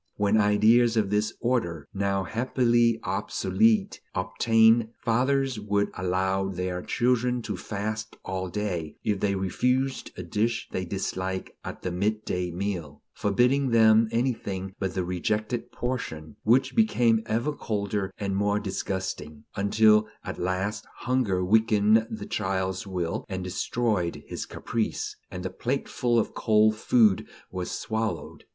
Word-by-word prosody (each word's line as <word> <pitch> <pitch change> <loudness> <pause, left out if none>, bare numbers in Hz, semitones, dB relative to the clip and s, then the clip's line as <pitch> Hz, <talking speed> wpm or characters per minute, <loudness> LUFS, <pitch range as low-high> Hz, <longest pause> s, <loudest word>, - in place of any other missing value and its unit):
When 105 +1 +3
ideas 110 +3 +4
of 105 -3 +1
this 105 +1 +1
order, 85 - -1
now 100 0 0
happily 120 +1 +2
obsolete, 220 -3 +1
obtained, 110 +5 +4
fathers 130 +1 +1
would 105 -1 0
allow 95 +1 0
their 90 -1 -3
children 125 +1 +1
to 105 -2 -3
fast 110 +3 -4
all 95 0 -3
day, 90 -6 -3
if 105 -2 0
they 100 0 +1
refused 125 +8 0
a 90 - -5
dish 110 +6 -1
they 95 - -2
disliked 95 0 -3
at - - -7
the 90 - -2
mid 105 +4 -1
day 90 -1 -1
meal, 85 -5 -4
forbidding 125 +7 +2
them 110 -1 +5
anything 105 -6 -2
but 95 -2 -2
the 90 -2 0
rejected 105 +6 -2
portion, 80 - -4
which 120 +5 +3
became 120 - +3
ever 120 +7 0
colder 100 -5 -2
and 100 -1 -2
more 100 +1 +1
disgusting, 95 -6 -4
until 105 +2 +4 0.2
at - - -6
last 95 +3 -1 0.2
hunger 110 -8 +1
weakened 110 +1 +4
the 110 -2 -6
child's 95 0 -2
will 90 -3 -2
and 95 -1 -3
destroyed 95 0 -1
his - - -5
caprice, 115 -2 -3
and 90 0 -6
the 95 - -2
plateful 125 -1 -1
of 115 - +1
cold 110 -1 +3
food 110 -3 +3 0.2
was 90 -1 -4
swallowed. 110 -8 -3
105 Hz, 135 wpm, -27 LUFS, 95-115 Hz, 0.2 s, them